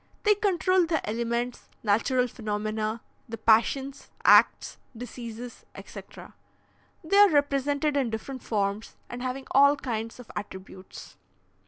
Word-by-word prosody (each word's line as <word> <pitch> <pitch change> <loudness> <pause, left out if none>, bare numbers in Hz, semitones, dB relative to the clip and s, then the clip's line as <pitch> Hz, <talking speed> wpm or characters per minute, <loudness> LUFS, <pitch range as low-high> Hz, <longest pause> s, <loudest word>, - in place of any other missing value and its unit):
They 420 - +5
control 370 -3 +2
the 320 -1 -1
elements, 235 +2 -3
natural 240 +4 +2
phenomena, 215 0 -3 0.3
the 230 - -5
passions, 250 +5 +1 0.2
acts, - - +5 0.2
diseases, 240 0 -8
etc. - - -11 0.7
They 345 +5 +1
are 410 0 +8
represented 285 0 +1
in 270 -4 +1
different 245 +4 -6
forms 205 0 -2
and 245 0 -7
having 255 +1 -4
all 280 +1 +6
kinds 230 -4 -5
of 245 - -11
attributes. 190 -2 -9
245 Hz, 120 wpm, -27 LUFS, 220-280 Hz, 0.7 s, are